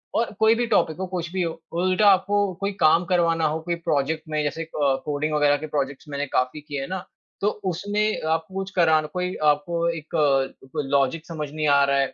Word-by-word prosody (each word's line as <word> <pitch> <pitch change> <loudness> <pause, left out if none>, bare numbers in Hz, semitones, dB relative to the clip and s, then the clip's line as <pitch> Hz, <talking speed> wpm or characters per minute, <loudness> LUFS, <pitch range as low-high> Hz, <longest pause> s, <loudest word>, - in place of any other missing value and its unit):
और 230 +1 +1
कोई 220 +1 +5
भी 240 +1 0
टॉपिक 160 -8 +2
हो, 190 - -3
कुछ 175 -2 -4
भी 190 - -1
हो, 165 -2 -3 0.2
उल्टा 185 +3 +3
आपको 200 0 +2
कोई 200 +1 0
काम 165 +3 +4
करवाना 170 -2 +2
हो 155 +2 -1
कोई 175 +1 -2
प्रोजेक्ट 160 -2 -1
में 155 -1 0
जैसे 150 +3 -2
अ, 160 - -14 0.4
कोडिंग 150 +1 -1
वगैरह 145 -1 +3
के 155 +2 -6
प्रोजेक्ट्स 140 -1 -3
मैंने 140 0 -2
काफ़ी 130 +4 0
किए 145 -2 -5
हैं 135 - -5
ना, 185 -1 -4 0.4
तो 200 - +2 0.2
उसमें 205 +4 -1
आपको 160 +3 -1
कुछ 195 0 -3
कराना 160 -3 +3
कोई 180 +3 -3
आपको 170 +3 0
एक 165 0 -5
अ, 135 -3 +1
कोई - - -1
लॉजिक 140 +3 +1
समझ 155 -3 -5
नहीं 155 0 -1
आ 140 -1 +5
रहा 140 0 +1
है 135 - 0
160 Hz, 220 wpm, -24 LUFS, 145-180 Hz, 0.4 s, कोई